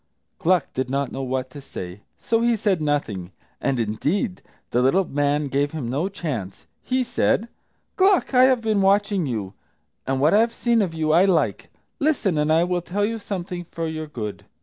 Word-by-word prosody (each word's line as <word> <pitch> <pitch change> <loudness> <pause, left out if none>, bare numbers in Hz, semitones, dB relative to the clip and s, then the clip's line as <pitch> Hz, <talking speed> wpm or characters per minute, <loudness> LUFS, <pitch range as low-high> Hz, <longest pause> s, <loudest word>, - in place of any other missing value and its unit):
Gluck 180 -4 +2
did 130 0 -2
not 140 0 -1
know 135 - -4
what 130 0 -2
to 145 - -9
say, 90 -6 -8 0.2
so 230 0 0
he 235 0 +3
said 200 -5 0
nothing; 110 -12 -1 0.3
and, 135 -3 0
indeed, 150 - -1 0.3
the 120 - +2
little 160 +10 +3
man 145 0 0
gave 140 +2 0
him 150 -7 -4
no 145 +10 -1
chance. 135 - -5 0.2
He 255 0 0
said, 230 -1 +1 0.5
"Gluck, 380 -5 +3
I 255 0 +7
have 260 -2 +3
been 215 -3 +1
watching 200 -3 +2
you, 105 -6 -3 0.5
and 135 0 0
what 150 +6 +4
I 210 - +6
have 230 +1 +2
seen 235 -2 +2
of 175 -5 -2
you, 155 -1 0
I 170 +4 +6
like. 180 -5 +1 0.3
Listen, 265 - +1
and 150 +1 +2
I 165 +2 +4
will 180 0 0
tell 200 +4 -1
you 225 +1 -3
something 180 -3 -5
for 165 0 -5
your 155 0 -4
good. 110 -8 -6
160 Hz, 195 wpm, -23 LUFS, 135-205 Hz, 0.5 s, I